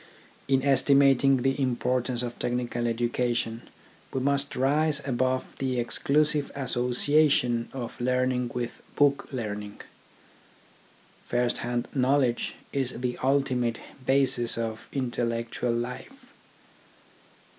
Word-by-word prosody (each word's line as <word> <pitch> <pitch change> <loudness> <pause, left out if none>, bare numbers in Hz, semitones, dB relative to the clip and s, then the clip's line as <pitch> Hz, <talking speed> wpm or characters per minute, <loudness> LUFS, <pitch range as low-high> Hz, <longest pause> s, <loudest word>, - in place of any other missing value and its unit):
In 135 -1 +2
estimating 135 -1 +4
the 135 +1 +1
importance 125 -1 0
of 120 -1 -6
technical 120 -1 -1
education 120 0 -1 0.4
we 130 - -1
must 140 +1 0
rise 145 +3 +2
above 130 0 -1
the 130 -2 -1
exclusive 150 +4 +1
association 125 -1 +2
of 125 -2 -6
learning 125 0 +1
with 120 -1 -4
book 140 -1 +2
learning. 105 -5 -5 1.5
First 120 0 0
hand 120 0 -2
knowledge 130 -2 +1 0.2
is 130 -3 -2
the 125 -1 -1
ultimate 130 -3 +1 0.2
basis 130 -3 +2
of 115 -1 -4
intel 125 -3 -1
lectual 115 +1 -2
life. 255 - -8
125 Hz, 100 wpm, -27 LUFS, 120-135 Hz, 1.5 s, estimating